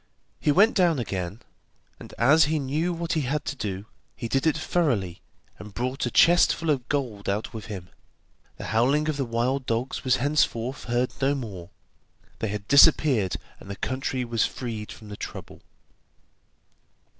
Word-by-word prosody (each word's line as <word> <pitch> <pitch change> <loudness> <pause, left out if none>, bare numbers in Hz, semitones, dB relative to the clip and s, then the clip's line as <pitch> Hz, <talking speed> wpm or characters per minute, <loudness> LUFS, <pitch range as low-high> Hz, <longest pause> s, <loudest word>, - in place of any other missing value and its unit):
He 150 - +2
went 205 +9 +5
down 175 -4 +3
again, 100 -3 -4 0.6
and - - -11
as 145 +5 +5
he 155 +2 0
knew 150 +5 -1
what 170 0 -2
he 155 - +1
had 145 +3 -2
to - - -3
do, 100 -5 -4 0.3
he 120 - -5
did 135 +6 +1
it 160 - +2
thoroughly, 115 - 0 0.4
and 105 -2 -11
brought 125 +3 -2
a - - -1
chest 175 +7 +5
full 165 -1 -1
of 130 -4 -2
gold 120 -9 -2
out 105 +4 -2
with 110 -2 -7
him. 95 -5 -7 0.7
The - - -7
howling 140 +7 +2
of 150 - -1
the 135 - -1
wild 125 +3 -1
dogs 115 +3 -2
was 130 -1 +3
henceforth 130 -2 0
heard 120 +1 0
no 140 +1 +2
more; 100 -10 -7 0.7
they 110 - -1
had 100 -1 -5
disappeared, 140 - +5 0.2
and - - -13
the 100 - -4
country 130 +2 -2
was 115 -2 0
freed 115 -4 -4
from 110 -2 -12
the 105 - -6
trouble. - - -8
125 Hz, 170 wpm, -26 LUFS, 110-145 Hz, 0.7 s, went